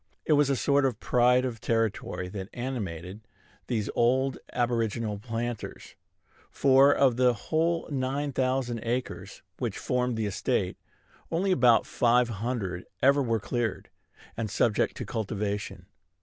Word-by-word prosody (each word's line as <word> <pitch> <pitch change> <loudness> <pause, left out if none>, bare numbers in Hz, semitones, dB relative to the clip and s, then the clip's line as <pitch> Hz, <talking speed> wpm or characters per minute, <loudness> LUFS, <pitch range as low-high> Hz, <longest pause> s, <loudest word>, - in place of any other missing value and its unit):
It 155 - +3
was 145 -1 +4
a 140 - +2
sort 140 +2 +2
of 120 -5 -1
pride 125 +1 +3
of 115 -3 -5
territory 110 -5 -1
that 95 0 -6
animated 105 -7 -5 0.5
these 110 -4 -1
old 130 +3 +2
aboriginal 115 -3 -1
planters; 115 +1 -5 0.6
for, 135 +1 +5
of 130 -5 +3
the 125 -1 +4
whole 165 +8 0
nine 140 +2 -1
thousand 130 -2 0
acres 115 -5 -4 0.2
which 120 -6 -2
formed 125 -2 -1
the 110 - -1
estate, 100 - -1 0.5
only 190 +4 0
about 125 -8 +5
five 120 0 +2
hundred 100 -5 -3 0.2
ever 140 +2 +5
were 115 -4 0
cleared, 115 0 -3 0.5
and 110 -2 -3
subject 105 +1 +1
to - - -4
cultivation. 100 -3 -3
120 Hz, 135 wpm, -28 LUFS, 110-130 Hz, 0.6 s, for